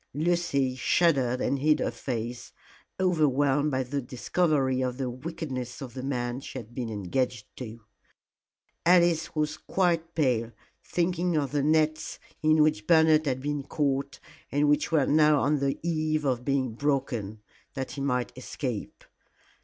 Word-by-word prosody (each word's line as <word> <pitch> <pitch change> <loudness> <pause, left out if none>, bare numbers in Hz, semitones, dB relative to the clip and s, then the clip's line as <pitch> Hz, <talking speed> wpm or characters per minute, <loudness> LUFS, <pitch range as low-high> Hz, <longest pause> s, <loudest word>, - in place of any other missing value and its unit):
Lucy 150 -5 +1
shuddered 130 -3 +2
and 140 - 0
hid 150 +2 +3
her - - -1
face, 120 -1 -5 0.5
overwhelmed 145 -5 +2
by 130 -2 0
the 140 +3 -3
discovery 130 +1 0
of 125 -1 -2
the 130 -2 -2
wickedness 130 -3 -5
of 130 -4 -8
the 130 - -5
man 125 -2 -2
she 135 - -8
had 120 -2 -9
been 120 -2 -4
engaged 110 +3 -2
to. 115 -2 -8 1.0
Alice 170 -2 +3
was 150 0 -1
quite 170 -3 0
pale, 120 -7 +1 0.3
thinking 175 -1 0
of 140 -3 -1
the 145 -1 +1
nets 155 +1 +1 0.2
in 155 0 +5
which 105 -9 0
Bernard 160 -2 +5
had 130 -1 -1
been 145 0 -1
caught, 140 -1 -1 0.3
and 145 +1 +2
which 145 +2 +2
were 150 -4 +3
now 150 0 +4
on 145 +1 +2
the 135 0 0
eve 155 -2 0
of 125 -3 0
being 130 -3 0
broken, 120 -6 -1 0.4
that 135 -2 -4
he 140 - -6
might 125 -4 -1
escape. - - -5
140 Hz, 150 wpm, -27 LUFS, 125-155 Hz, 1.0 s, in